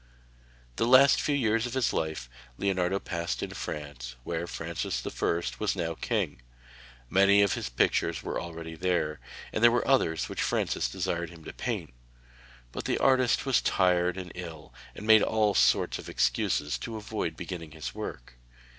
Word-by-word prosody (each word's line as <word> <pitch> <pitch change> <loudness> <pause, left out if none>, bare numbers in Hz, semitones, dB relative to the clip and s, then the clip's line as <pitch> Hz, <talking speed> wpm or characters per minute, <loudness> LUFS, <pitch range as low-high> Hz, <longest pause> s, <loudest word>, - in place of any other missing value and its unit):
The 115 - +1
last 130 +3 +7
few 145 - +1
years 115 -3 +1
of 125 - -6
his 130 -2 +1
life 80 -5 -2 0.3
Leonardo 95 -1 +1
passed 85 -2 -3
in - - -4
France, 70 -5 -6
where 85 +3 -3
Francis 80 -8 -4
I. 85 - 0 0.2
was 105 -3 0
now 85 -3 -2
king. 80 - -2 0.7
Many 100 +5 +5
of 100 - +2
his - - -3
pictures - - +1
were - - -3
already 80 -1 -7
there, 80 -2 -1 0.3
and 110 - -1
there 120 - +9
were 120 0 0
others 85 -12 +2
which - - -4
Francis - - 0
desired 85 -3 -2
him 80 -1 -13
to - - -8
paint. - - -4 0.8
But - - -6
the - - +1
artist 130 -1 +3
was 135 -3 +3
tired 90 -1 +2
and 90 -2 -6
ill, 80 -7 -9 0.2
and 105 - -8
made 110 -1 +7
all 110 -2 +2
sorts 65 -6 +3
of - - -9
excuses 75 - 0
to 115 -2 -5
avoid 105 -6 -4
beginning 85 -2 -6
his 80 -2 -6
work. - - -7
90 Hz, 165 wpm, -28 LUFS, 80-110 Hz, 0.8 s, there